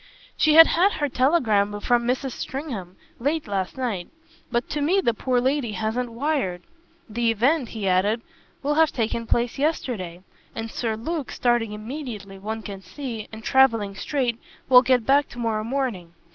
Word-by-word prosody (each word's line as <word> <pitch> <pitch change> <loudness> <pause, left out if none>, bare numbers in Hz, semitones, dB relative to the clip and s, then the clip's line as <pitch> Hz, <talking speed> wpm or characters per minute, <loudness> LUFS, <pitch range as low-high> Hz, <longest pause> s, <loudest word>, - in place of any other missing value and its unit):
"She 310 -1 +4
had 325 0 +11
had 370 +6 +3
her 295 - -1
telegram 225 -8 +2
from 240 +2 +1
Mrs. 260 +2 -1
Stringham; 235 - -6 0.2
late 295 +4 -1
last 195 +2 -2
night. 225 -9 -2 0.4
But 240 0 0
to 295 - -2
me 350 +7 +3
the 235 -11 +2
poor 250 +2 0
lady 260 -3 0
hasn't 225 +4 -2
wired. 235 - -1 0.4
The 230 +2 0
event," 245 +4 +2
he 215 -4 -4
added, 205 +5 +2 0.4
"will 290 +2 +1
have 320 +1 +4
taken 230 -1 -2
place 240 +2 0
yesterday, 215 - -2 0.3
and 225 0 -5
Sir 225 -2 -2
Luke, 300 +4 -3
starting 240 -3 +1
immediately, 215 -4 -7
one 220 +2 -5
can 195 -2 -7
see, 235 -2 -6
and 220 0 -9
travelling 230 -7 +3
straight, 240 +2 -1 0.3
will 250 -1 +9
get 255 -3 +2
back 280 +3 +3
tomorrow 225 -3 -2
morning. 225 -9 -3
235 Hz, 160 wpm, -24 LUFS, 215-275 Hz, 0.4 s, had